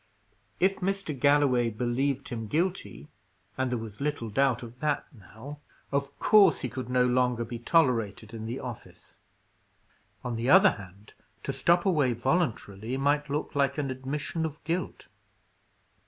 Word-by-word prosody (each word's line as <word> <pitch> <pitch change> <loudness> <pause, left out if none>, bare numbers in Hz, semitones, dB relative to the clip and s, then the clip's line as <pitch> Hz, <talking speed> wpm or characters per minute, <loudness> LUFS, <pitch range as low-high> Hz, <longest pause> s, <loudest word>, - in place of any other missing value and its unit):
If 190 +1 +3
Mr. 195 -3 -2
Galloway 140 -4 +4
believed 125 +5 -1
him 115 -3 -4
guilty 175 - -2 0.5
and 130 -1 -1
there 125 - -1
was 110 0 -8
little 145 -6 -2
doubt 130 +1 +2
of 120 +1 -11
that, 150 0 0
now 115 +7 -11 0.3
of 140 0 -2
course 200 -7 +5
he 130 - -2
could 125 +1 -6
no 125 0 +3
longer 125 -1 +1
be 120 0 -6
tolerated 115 -7 +1
in 110 -1 -6
the 120 +3 -4
office. 120 -3 -10 1.0
On 120 -2 -3
the 120 +3 -1
other 190 +5 +8
hand, 100 +1 -12 0.3
to - - -2
stop 175 +2 +2
away 150 -10 +3
voluntarily, 120 - -1
might 145 +2 +1
look 145 +2 -2
like 140 0 +1
an 140 -3 -1
admission 140 +5 -3
of 155 -2 -3
guilt. 170 +4 -3
130 Hz, 150 wpm, -28 LUFS, 120-150 Hz, 1.0 s, other